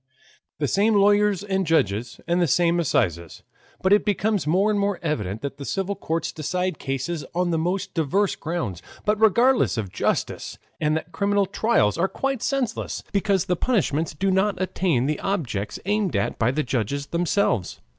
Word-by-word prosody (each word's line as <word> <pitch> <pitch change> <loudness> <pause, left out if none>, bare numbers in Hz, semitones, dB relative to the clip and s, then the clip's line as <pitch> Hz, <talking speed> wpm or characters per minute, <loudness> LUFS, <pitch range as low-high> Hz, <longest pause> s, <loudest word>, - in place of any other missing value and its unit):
The 145 - 0
same 210 - +2
lawyers 205 -1 +3
and 190 -1 0
judges, 115 -7 0
and 175 +1 +2
the 175 - +3
same 170 +4 +3
assizes, 95 - -1 0.4
but 190 +1 +5
it 210 - +4
becomes 205 -3 0
more 190 +7 +3
and 205 - +1
more 200 -1 0
evident 110 - -2
that 140 0 -4
the 140 - -7
civil 195 +6 -2
courts 165 -2 -2
decide 180 +2 -2
cases 140 +4 -3
on 180 0 +1
the 165 - +1
most 180 +4 -2
diverse 185 +5 +1
grounds, 155 - -4 0.2
but 210 +1 +1
regardless 235 - +4
of 100 -5 -3
justice, - - -2 0.2
and 155 0 +1
that 160 +2 -7
criminal 200 0 +1
trials 195 - +1
are 180 - +3
quite 270 +3 -2
senseless, 270 -2 -2
because 195 -2 +1
the 180 - +1
punishments 165 - 0
do 195 +5 0
not 190 0 +1
attain 180 -8 0
the 150 +1 -1
objects 130 - -2
aimed 205 -2 0
at 100 - -1
by 115 - +3
the 150 +4 0
judges 135 +3 -2
themselves. 170 - 0
175 Hz, 175 wpm, -24 LUFS, 145-200 Hz, 0.4 s, but